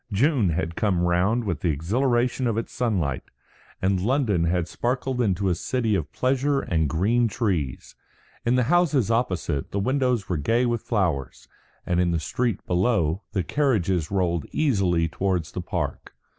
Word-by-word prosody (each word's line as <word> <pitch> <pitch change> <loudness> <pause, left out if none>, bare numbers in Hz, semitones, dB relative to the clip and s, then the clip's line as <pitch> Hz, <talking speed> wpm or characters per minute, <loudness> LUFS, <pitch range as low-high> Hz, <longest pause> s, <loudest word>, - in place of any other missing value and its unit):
June 120 - +2
had 85 0 -2
come 95 -5 +1
round 90 +7 +2
again - - -7
with 85 -4 -1
the 85 - 0
exhilaration 120 - +1
of 115 -2 0
its 115 - -4
sunlight, 90 - -1 0.6
and 95 -1 +2
London 110 - +1
had 85 0 0
sparkled 125 +3 -2
into 100 -3 +1
a 90 - +3
city 115 +5 -1
of 80 -7 -1
pleasure 135 +2 +1
and 80 - 0
green 110 +9 +2
trees. 95 - -2 0.5
In 120 +1 +2
the 125 - +3
houses 145 - +2
opposite, 90 - -1
the - - -4
windows 125 -1 0
were 90 - -1
gay 115 - +1
with 120 -2 0
flowers; 85 - -2 0.4
and 90 0 0
in 90 -1 +2
the 85 -1 0
street 115 +6 -2
below, 90 -2 +1
the 95 -4 0
carriages 95 - 0
rolled 90 -5 0
easily 95 - +1
towards 90 -1 -1
the 90 - -4
Park. 85 - -4
100 Hz, 165 wpm, -24 LUFS, 85-120 Hz, 0.6 s, a